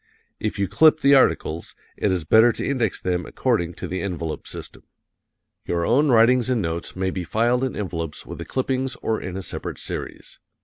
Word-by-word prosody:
If 105 - -3
you 100 -1 0
clip 155 - +4
the 140 +1 +5
articles, 85 - +2 0.2
it 100 - 0
is 90 -3 0
better 110 +8 +6
to - - -4
index 120 -7 0
them 90 -1 -1
according 85 0 -1
to - - -6
the 95 - -3
envelope 85 -5 -4
system. - - -7 0.9
Your 85 -1 0
own 140 - +3
writings 120 +1 +4
and 125 -2 +2
notes 85 -3 -3
may 95 0 -1
be 90 - -4
filed 120 +7 +1
in 130 - -2
envelopes 85 -6 -4
with - - -8
the - - -5
clippings 130 0 -2
or 110 -1 0
in 95 0 -5
a 95 - -5
separate - - -5
series. - - -6
105 Hz, 190 wpm, -23 LUFS, 90-125 Hz, 0.9 s, better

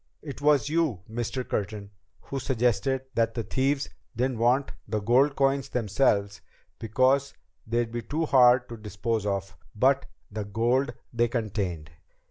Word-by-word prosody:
It 140 -3 -7
was 145 -1 +4
you, 155 - 0
Mr. 120 +3 -3
Curtin, 105 0 -3 0.3
who 135 - -5
suggested 130 0 0
that 115 -1 +1
the 115 - -2
thieves 135 +6 0 0.3
didn't 125 0 -1
want 125 +4 +2 0.2
the 105 +1 -1
gold 130 +7 +3
coins 135 0 +1
themselves 100 -3 +1 0.4
because 130 +5 +2 0.3
they'd 115 0 0
be 120 0 -3
too 155 +8 -2
hard 125 -3 +5
to 115 - -7
dispose 105 0 -2
of, 100 -1 -2 0.2
but 135 +4 +3 0.2
the 105 0 -3
gold 120 +5 0 0.2
they 120 0 +2
contained. 100 -9 -3
120 Hz, 140 wpm, -27 LUFS, 105-135 Hz, 0.4 s, hard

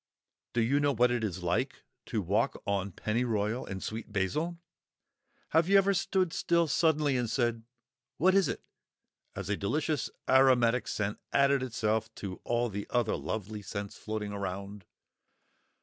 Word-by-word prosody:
Do 120 - +2
you 135 +6 +3
know 145 -2 +2
what 120 +1 +4
it 120 -2 0
is 95 -4 -3
like 85 0 -1 0.2
to - - -1
walk - - +1
on 100 -1 -1
Pennyroyal 110 +2 -1
and 95 -1 -5
Sweet 110 0 -5
Basil? 150 - -1 0.9
Have 165 +3 +3
you 200 - +7
ever 195 0 +4
stood 185 -1 +1
still 170 -1 +2
suddenly 150 -2 +2
and 120 -3 0
said, 120 -2 0 0.6
"What 185 +4 +4
is 195 -1 +4
it?" - - -4 0.7
as - - -5
a 105 - +1
delicious 145 +6 -1 0.2
aromatic 125 -2 +4
scent 105 0 -2
added 140 -1 +4
itself 110 -3 -1
to 95 -2 -6
all 120 0 +1
the 100 0 -5
other 120 -3 +1
lovely 105 0 -4
scents 100 0 -5
floating 105 -1 -4
around? 100 0 -5
115 Hz, 150 wpm, -30 LUFS, 105-140 Hz, 0.9 s, you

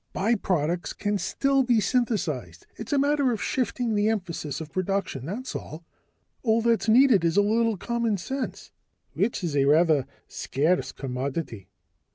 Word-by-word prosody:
Byproducts 180 -5 0
can 205 -1 -1
still 275 +5 +1
be 245 -3 +3
synthesized. 190 - -1
It's 225 - -8
a 290 - +2
matter 285 -1 +2
of 225 - -2
shifting 245 -1 -1
the 210 +1 +2
emphasis 170 -9 -3
of 160 -1 -8
production, 185 -8 -2
that's 240 +9 -5
all. 160 +2 -7 0.6
All 225 -1 +2
that's 230 -1 +2
needed 235 -5 +6
is 165 +2 +1
a 205 - +6
little 225 +1 +1
common 235 +1 -1
sense." 265 +9 -5 0.4
"Which 215 -4 -1
is 160 -4 -2
a 140 -1 +3
rather 155 -1 +4 0.2
scarce 160 +7 0
commodity." 130 - -5
200 Hz, 150 wpm, -26 LUFS, 160-235 Hz, 0.6 s, needed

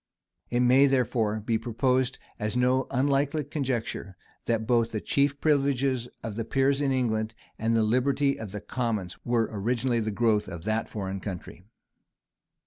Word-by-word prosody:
It 120 0 +1
may, 130 +3 +6
therefore, 115 -5 +1
be 110 +1 0
proposed 125 +3 0 0.2
as 105 +3 -2
no 125 +1 +2
unlikely 140 +3 +1
conjecture, 125 - -3 0.3
that 115 -1 0
both 115 -1 +2
the 110 - -2
chief 140 +5 +1
privileges 135 -4 +1 0.2
of 110 -2 -4
the 115 - -2
peers 135 +4 +1
in 140 -2 +1
England 110 -4 0 0.2
and 115 +1 +2
the 110 - +3
liberty 135 +5 +2
of 110 -3 -6
the 105 0 -5
commons 105 -5 -3
were 120 -2 +1
originally 120 +3 0
the 110 -1 -1
growth 110 0 +1
of 85 -3 -7
that 110 +1 -1
foreign 95 -2 -4
country. 90 -2 -7
120 Hz, 155 wpm, -27 LUFS, 110-135 Hz, 0.3 s, may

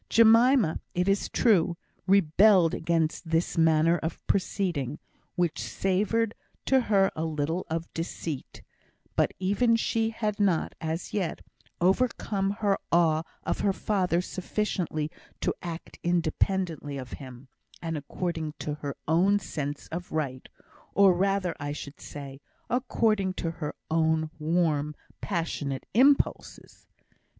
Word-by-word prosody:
Jemima, 230 - +5 0.2
it 180 +1 +1
is 195 0 +1
true, 180 -7 +3 0.3
rebelled 190 -1 +5
against 165 0 0
this 165 +1 +1
manner 165 0 +4
of 160 0 -4
proceeding, 170 - -1 0.4
which 175 -3 0
savoured 210 +4 0 0.3
to 265 - +4
her 200 -4 +3
a 160 - -2
little 160 +2 -2
of 165 +1 -2
deceit; 165 -3 -5 0.5
but - - +2
even 205 +5 +2
she 225 0 +1
had 215 -2 -2
not, 190 -6 +2
as 160 +2 -3
yet, 190 -6 -2 0.4
overcome 195 0 +1
her 200 -1 0
awe 165 -2 +4 0.2
of - - -2
her 200 - +2
father 185 -4 +1
sufficiently 180 -5 -2 0.3
to - - 0
act 170 -2 -7
independently 170 -2 0
of 130 -2 -7
him, 130 -1 -9 0.3
and 165 -1 -3
according 160 +1 -3
to 150 - -3
her 140 -1 -4
own 180 +6 +4
sense 145 -7 -4
of 175 +2 -6
right 140 -5 -3 0.5
or 200 -2 +7
rather, 190 -1 0
I 145 0 -3
should 145 -1 -8
say, 140 -1 -8 0.3
according 220 -6 +1
to 165 - -2
her 160 -3 -5 0.2
own 160 -1 +2
warm, 155 -2 +1 0.3
passionate 155 -7 -2
impulses. 270 +6 +2
170 Hz, 125 wpm, -28 LUFS, 155-200 Hz, 0.5 s, or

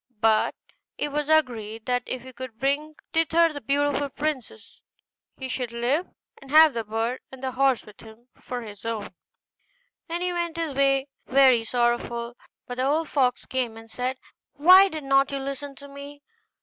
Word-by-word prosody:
But 220 0 +3 0.4
it 295 - -2
was 295 +1 -2
agreed, 225 -8 +1
that, 245 0 +1
if 255 -2 -4
he 260 0 -11
could 250 -2 -8
bring 285 +4 -1 0.2
thither 330 0 +3
the 285 - -7
beautiful 285 0 0
princess, 300 - -5 0.6
he 265 - -5
should 250 -2 -3
live, 250 +9 0 0.3
and 275 - -14
have 310 0 +7
the 230 -1 -2
bird 225 +4 -2
and 265 0 -11
the 260 - -1
horse 265 -1 +2
given 210 +1 -15
him 240 +2 -31
for 245 -1 -6
his 205 -2 -11
own. 225 -4 -4 0.9
Then 340 +1 -3
he 360 0 -1
went 340 -1 -2
his 325 -3 -2
way 275 0 +2 0.2
very 260 -3 +5
sorrowful; 240 0 -1 0.3
but 245 - -7
the 255 - 0
old 305 +3 +1
fox 255 -3 +1
came 245 -4 -2
and 225 0 -13
said, 255 +1 -2 0.4
'Why 370 +6 +7
did 310 -4 -6
not 275 0 +3
you 275 - -2
listen 275 +1 -5
to 280 +1 -12
me? 280 +1 -11
270 Hz, 175 wpm, -25 LUFS, 240-290 Hz, 0.9 s, have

